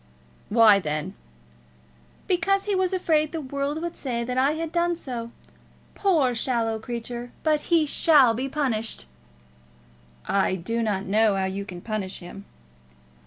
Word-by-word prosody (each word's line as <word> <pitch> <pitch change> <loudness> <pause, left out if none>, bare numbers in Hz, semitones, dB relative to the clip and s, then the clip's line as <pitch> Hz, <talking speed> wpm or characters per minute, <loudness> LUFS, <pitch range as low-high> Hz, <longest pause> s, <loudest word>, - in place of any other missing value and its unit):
"Why 215 -2 +6
then?" 155 +2 -3 1.1
"Because 390 +2 +1
he 415 - -1
was 375 -1 +1
afraid 315 -5 +1
the 325 - -3
world 280 +1 -3
would 345 0 -4
say 240 -4 -3
that 250 +1 -3
I 270 +3 +3
had 320 0 -4
done 345 0 +1
so. 245 -7 -6 0.6
Poor 315 -11 +2
shallow 225 -2 -1
creature! 240 +1 -6
But 305 -2 0
he 335 -3 +4
shall 285 -5 +5
be 260 +4 -3
punished." 230 - -2 1.2
"I 195 -1 +1
do 230 +6 -3
not 205 -3 -1
know 210 +1 +3
how 190 -1 0
you 195 +1 -4
can 180 -2 -9
punish 205 -3 -4
him." 195 +3 -10
245 Hz, 145 wpm, -25 LUFS, 215-310 Hz, 1.2 s, Why